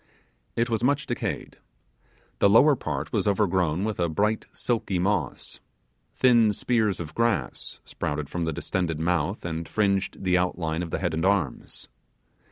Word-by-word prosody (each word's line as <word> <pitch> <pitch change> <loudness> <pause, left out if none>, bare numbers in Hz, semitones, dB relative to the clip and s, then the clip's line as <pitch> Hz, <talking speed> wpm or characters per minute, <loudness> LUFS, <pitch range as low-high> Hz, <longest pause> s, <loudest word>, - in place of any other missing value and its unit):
It 115 +1 +1
was 115 -1 -1
much 140 +2 +2
decayed. - - -4 0.8
The 100 - +5
lower 140 +8 +6
part 75 - -4
was - - +1
overgrown 95 -4 +1
with 110 -2 -2
a 85 -1 +1
bright 105 +7 0
silky 110 -6 -1
moss. 100 +3 -1 0.6
Thin 120 -4 +5
spears 110 -2 +1
of 80 -2 -6
grass 115 +3 -1
sprouted 75 0 -3
from 85 +2 -3
the 80 - -1
distended 80 0 -2
mouth, 90 +3 0
and 80 -1 -4
fringed 100 -3 0
the 90 -1 +3
outline 85 -2 -1
of 85 - -4
the - - -2
head 85 -3 -1
and 80 - -1
arms. 95 -9 -1
95 Hz, 155 wpm, -26 LUFS, 80-110 Hz, 0.8 s, lower